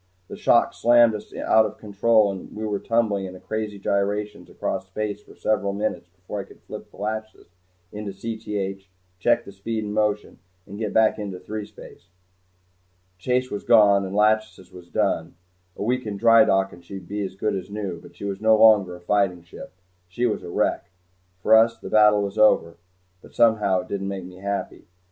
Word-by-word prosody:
The - - -7
shock - - +3
slammed 120 -1 +5
us 105 - -7
out 110 - +3
of - - -11
control 105 0 +2
and 95 -1 -9
we 110 +1 -4
went 105 -2 -3
tumbling 110 -4 +1
in 90 0 -9
crazy 110 0 -4
gyrations 100 +1 -2
across - - -4
space 105 -1 -4
for - - -17
several 100 -2 0
minutes 100 -4 -3
before 90 +3 -8
I - - -4
could - - -19
flip - - -9
the - - -19
"Lachesis" 110 -2 -5 0.4
into 105 0 -6
Cth, 100 -2 -5 0.3
check 120 +3 +2
the - - -10
speed 110 +3 -4
and 105 0 -5
motion, 105 -1 -1 0.3
and 100 +1 -10
get 110 -2 -2
back 110 0 +3
into 100 -3 -5
threespace. 105 -3 -9 1.1
Chase 125 +5 0
was 105 - -4
gone 100 -4 +5
and 95 +1 -5
"Lachesis" 105 -3 +1
was 90 -1 -13
done. - - -1 0.4
A - - -5
week 125 +1 -1
in 100 -1 -4
drydock 110 -4 +4
and 85 - -14
she'd 95 0 -9
be 105 0 -3
as 95 -1 -6
good 105 +2 -1
as 95 0 -6
new, 100 -5 -5
but - - -16
she - - -8
was 100 0 -4
no 110 0 +5
longer 105 -5 +5
a - - -12
fighting 90 -1 0
ship. 85 - -11 0.4
She 105 +8 -2
was 110 - -1
a - - -9
wreck. 85 - -1 0.5
For - - +4
us 115 +1 +4
the - - -9
battle 105 -1 +5
was 100 +2 -4
over 85 -6 +4 0.4
but - - -17
somehow 105 -5 +3
it 90 - -13
didn't 95 -1 -3
make 95 -2 -5
me 90 0 -12
happy. 100 +1 -5
105 Hz, 190 wpm, -23 LUFS, 95-110 Hz, 1.1 s, slammed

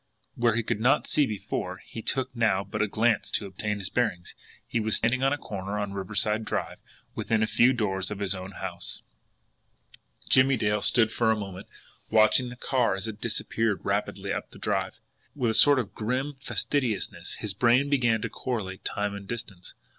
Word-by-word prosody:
But - - -12
where 115 -2 +4
he 120 - +1
could 105 - -1
not 120 +4 +3
see 145 -3 +2
before, 95 -3 -4
it 115 - -7
took 130 -1 -1
now 110 -5 +2
but 100 - -4
a 105 - +2
glance 110 +1 +1
to - - 0
obtain 105 +2 -3
his 100 -1 -5
bearings 100 -8 -1 0.3
he 120 - -1
was 110 0 +1
standing 120 +3 +2
on 135 0 +3
a 145 - 0
corner 100 -5 -5
on 100 -1 -3
Riverside 105 +3 +3
Drive, 105 - -3 0.3
within 110 -1 0
a - - +4
few 120 +3 +4
doors 95 -6 -1
of 105 - -5
his 100 -1 +1
own 95 +1 -7
house. - - -5 1.2
Jimmie 130 0 +5
Dale 105 -1 +1
stood 115 -2 +4
still - - -8
for 115 -2 +3
a - - +3
moment, 95 -2 -7 0.4
watching 110 +3 +4
the 125 - -8
car 125 -4 +1
as 95 +3 -3
it 110 -1 -7
disappeared 115 -2 -1
rapidly - - -1
up - - -4
the - - -14
Drive. - - -2 0.4
And 145 - -12
with 115 - +3
a - - -2
sort 145 +4 +7
of 120 -5 -2
grim 130 +6 -2
facetiousness 130 -7 -1
his 105 -2 -3
brain 120 +6 +3
began 120 -6 +2
to - - -2
correlate 100 -7 -4
time 105 0 -2
and 100 -1 -8
distance. 105 -5 -7
110 Hz, 200 wpm, -27 LUFS, 100-120 Hz, 1.2 s, sort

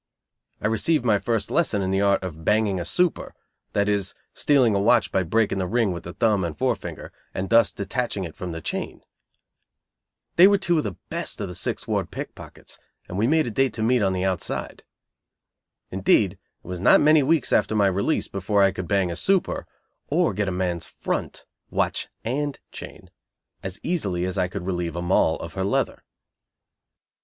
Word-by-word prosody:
I - - -6
received 120 +6 +1
my 105 -4 +3
first 115 -1 -1
lesson 110 - +1
in 95 - -1
the 95 +1 +1
art 100 -1 +2
of 80 -3 -6
"banging 105 -1 +2
a 85 - -4
super," 180 - 0 0.4
that 100 0 +1
is, 100 -1 -1 0.2
stealing 130 -7 +3
a 100 - +2
watch 120 +4 +3
by 95 - +2
breaking 100 +3 +1
the 90 - -1
ring 115 -1 +1
with 85 -2 -6
the 90 - -7
thumb 105 -5 +2
and 85 -2 -4
forefinger, 125 -6 -3 0.2
and 95 +3 -3
thus 115 0 +5
detaching 105 -1 -3
it 85 -3 -7
from 90 -1 -5
the 80 0 -6
chain. - - -4 1.3
They 180 +3 +9
were 200 0 +4
two 175 -4 +1
of - - -2
the 100 - -3 0.2
best - - -3
of - - -3
the - - -6
Sixth - - -3
Ward - - -1
pickpockets, - - -9 0.3
and 90 - -7
we 110 - +3
made 155 +2 +3
a 120 - -3
date 135 +2 +1
to 110 - -3
meet 125 +1 +3
"on 95 -2 +2
the 90 0 -1
outside." 95 -3 -3 1.1
Indeed, 95 +1 +3
it 95 - -18 0.3
was 90 -1 -5
not - - +6
many 155 0 +5
weeks 145 0 +2
after 110 - +2
my 105 -2 +4
release 100 - +1
before 100 +1 +1
I 95 - +4
could 95 -2 -6
"bang 100 -3 +1
a - - -4
super," 190 - 0 0.4
or 160 - +2
get 100 +1 -1
a - - 0
man's 90 -2 -2
"front" - - -4 0.2
(watch - - 0 0.2
and 140 +5 -2
chain) - - -10 0.5
as 95 +1 -5
easily 100 - -1
as 95 - -3
I 90 -2 +1
could 90 0 -6
relieve 90 -3 -2
a 85 - -3
Moll 85 -2 +3
of 85 - -8
her 95 - -2
"leather". 100 - -1
100 Hz, 195 wpm, -24 LUFS, 95-120 Hz, 1.3 s, They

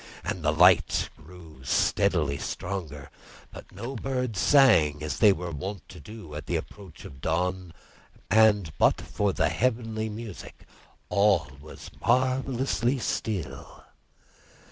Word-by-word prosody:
And 90 -3 -4
the 75 - +2
light 85 +1 +4
grew 80 -3 -15
steadily 75 -1 +1
stronger, 80 -7 -6 0.4
but - - -12
no 130 +3 -7
birds 125 -4 -3
sang 80 - +4
as 75 -4 -4
they 105 - +7
were 90 -2 -3
wont 90 +4 -6
to - - -11
do 105 -2 -11
at 75 - -7
the - - -1
approach 95 -6 -8
of 65 -1 -12
dawn; 90 +3 -1 0.6
and 105 -5 +4
but - - +4
for - - -1
the - - +1
heavenly 115 -3 -1
music 105 -2 -9 0.4
all 100 -8 +2
was 75 - -11
marvellously 130 0 +1
still. 110 - -4
95 Hz, 125 wpm, -27 LUFS, 80-110 Hz, 0.6 s, they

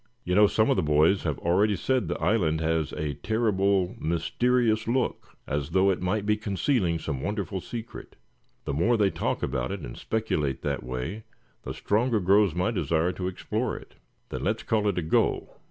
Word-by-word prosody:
"You 90 - -2
know, 105 +2 +6
some 110 +5 +2
of 135 - +2
the - - +3
boys 75 +6 +3
have 75 -4 -1
already 100 +5 +2
said 125 +2 0
the 85 - -3
island 80 -4 +1
had 80 -2 0
a 75 -1 -2
terrible 100 +1 +1
mysterious 110 +7 +1
look, 125 +2 -2
as 70 +1 -2
though 95 +3 +3
it 90 - -2
might 100 +3 -1
be 105 0 +2
concealing 100 - 0
some 75 -4 -4
wonderful 95 0 -3
secret. 115 +5 -8 0.5
The - - -2
more 110 - +2
they 100 -3 +3
talk - - -2
about 65 -1 -1
it, - - -4
and - - -7
speculate 75 - -2
that 70 -1 -1
way, 65 - -5 0.4
the - - -6
stronger 110 +2 +1
grows 100 -1 +3
my 90 +6 +1
desire 85 -5 +1
to 90 0 -4
explore 95 - -2
it." - - -13 0.4
"Then - - -5
let's - - -1
call 105 -2 +1
it 100 - 0
a 90 - 0
go. 80 - +1
95 Hz, 185 wpm, -27 LUFS, 80-110 Hz, 0.5 s, know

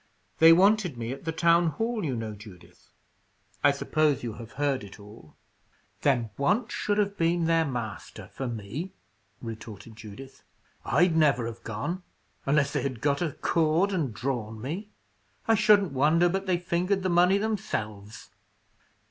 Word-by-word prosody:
"They 165 0 +9
wanted 190 - +4
me 115 0 -4
at 135 +4 -8
the 160 - -1
town 170 +1 +3
hall, 225 +7 -2
you 135 -6 -1
know, 110 -2 -4
Judith. 105 -4 -15 0.7
I 145 - +7
suppose 145 0 +1
you 115 -2 -4
have 115 0 -11
heard 140 -4 -1
it 100 +1 -12
all?" 105 -6 -15 0.7
"Then, 120 -6 +1
want 210 - +1
should 205 0 -1
have 200 -1 +1
been 170 0 +1
their 165 0 +3
master, 120 -6 -6
for 135 - -4
me," 120 - -5 0.5
retorted 110 -1 -8
Judith. 110 +5 -11 0.4
"I'd 170 +2 +3
never 145 -7 +3
have 115 0 -7
gone, 115 - -4 0.5
unless 140 0 +2
they 145 - 0
had 130 -3 -3
got 140 +4 0
a 165 -5 -1
cord 165 +4 +1
and 155 -9 -1
drawn 110 -2 -4
me. 170 - -5 0.6
I 225 - +5
shouldn't 210 -4 +4
wonder 155 +6 +3
but 195 +2 -2
they 180 -2 +2
fingered 180 +2 -1
the 185 - 0
money 180 +3 +4
themselves." 110 - -4
145 Hz, 155 wpm, -27 LUFS, 115-175 Hz, 0.7 s, They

